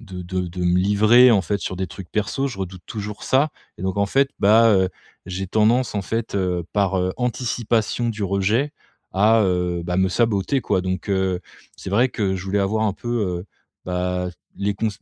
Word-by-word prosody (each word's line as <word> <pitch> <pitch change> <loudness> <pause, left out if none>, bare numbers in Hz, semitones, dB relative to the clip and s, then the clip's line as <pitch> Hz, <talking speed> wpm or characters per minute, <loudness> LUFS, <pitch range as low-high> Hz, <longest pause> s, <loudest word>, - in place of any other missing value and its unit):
de 95 -6 -8
de 90 0 -4
me 90 +1 +3
livrer 110 +6 +6
en 100 - +4
fait 100 - -1
sur 95 - -4
des 95 - -2
trucs 95 -3 -10
perso. 135 +6 -1
Je 110 - -8
redoute 95 -2 -6
toujours 105 -1 -6
ça. 140 +4 +3 0.3
Et - - -8
donc 95 +1 -2
en 100 - +3
fait, 135 +5 +2
bah, 110 +3 +6
heu, 95 -1 +2 0.4
j'ai 95 +1 -4
tendance, 110 +5 +2
en 100 - -1
fait, 115 +1 -3
heu, 90 -3 -1
par, 95 -2 +2
heu, 90 0 0
anticipation 120 -1 0
du 110 -1 -5
rejet 105 +9 +1 0.4
à, 110 +4 +4
heu, 90 -2 0
bah, 90 +1 -2
me 95 - +3
saboter 115 +5 +1
quoi. 95 - +1
Donc, 95 +2 -3
heu, 95 -2 0 0.4
c'est - - -7
vrai 120 +6 +3
que, 95 -3 -1
je 90 - -7
voulais 95 +1 0
avoir 110 +3 0
un 100 - +1
peu, 120 - -8 0.3
heu, - - -17 0.4
bah, 90 0 -1 0.3
les 100 0 -1
cons 110 +2 -1
100 Hz, 200 wpm, -22 LUFS, 95-110 Hz, 0.4 s, livrer